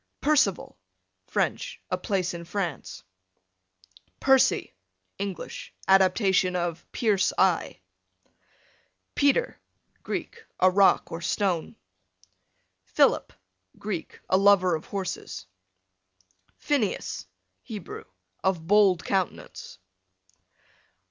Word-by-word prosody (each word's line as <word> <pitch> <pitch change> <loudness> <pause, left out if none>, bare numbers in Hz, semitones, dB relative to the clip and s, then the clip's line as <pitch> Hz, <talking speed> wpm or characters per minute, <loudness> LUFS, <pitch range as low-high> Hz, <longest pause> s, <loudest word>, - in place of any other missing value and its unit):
Percival, 300 0 +1 0.5
French, - - -2
a - - +3
place 190 -5 -1
in 170 0 -6
France. 175 -3 -4 1.2
Percy, 265 - +3 0.5
English, 200 -2 -6
adaptation 190 -1 +4
of 175 -1 -3
"pierce 205 -5 +2
eye." - - +1 1.3
Peter, 285 - +1 0.4
Greek, 460 - -5 0.2
a 185 0 +5
rock 195 +1 +4
or 165 - -5
stone. 175 -1 -1 1.1
Philip, 95 0 +2 0.5
Greek, 200 -5 -5
a 185 - +3
lover 195 -2 +5
of 155 - -3
horses. 190 - -5 1.1
Phineas, 265 -9 -1 0.3
Hebrew, 255 - -8 0.4
of 185 -4 0
bold 195 -1 +4
countenance. 190 -2 -3
195 Hz, 80 wpm, -26 LUFS, 180-210 Hz, 1.3 s, a